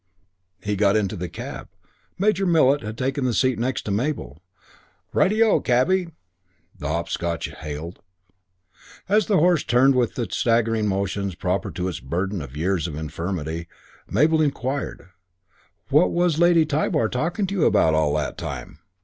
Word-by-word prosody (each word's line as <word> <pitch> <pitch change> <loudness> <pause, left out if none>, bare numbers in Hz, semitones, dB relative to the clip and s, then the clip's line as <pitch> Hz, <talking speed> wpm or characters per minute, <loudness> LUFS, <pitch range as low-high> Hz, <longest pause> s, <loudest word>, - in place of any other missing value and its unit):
He 105 0 -1
got 100 0 +3
into 105 -1 0
the 90 -2 -5
cab. - - -7 0.5
Major 195 -1 +2
Millet 145 -4 +4
had 110 0 -6
taken 135 +2 -1
the 125 -3 0
seat 130 -4 +2
next 125 0 -2
Mabel. 110 - -2 0.7
"Ri - - +4
te 215 +2 +3
O, 220 - +3
Cabby!" 170 +10 +2 0.7
the - - -4
Hopscotch 85 +1 -2
hailed. 75 +3 -7 1.1
As 210 +1 +3
the 205 - +3
horse 175 -2 +3
turned 130 +3 +4
with 125 -3 +1
the 120 -3 -2
staggering 115 -2 +1
motions 100 -1 -2
proper 90 +2 -1
to 90 0 -2
its 90 - -4
burden 90 +8 -3
of 70 0 -9
years 90 +1 0
and 75 -3 -6
infirmity, 80 +1 -4 0.4
Mabel 155 +9 +3
inquired, 140 - -2 0.8
"What 150 +5 +4
was 175 -2 +1
Lady 170 -2 +5
Tybar 145 -6 +1
talking 170 +10 -1
to 195 - -4
you 185 -6 +2
about 80 - +4
all 75 -1 +2
that 75 -2 -2
time?" 75 - -6
115 Hz, 155 wpm, -23 LUFS, -, 1.1 s, Lady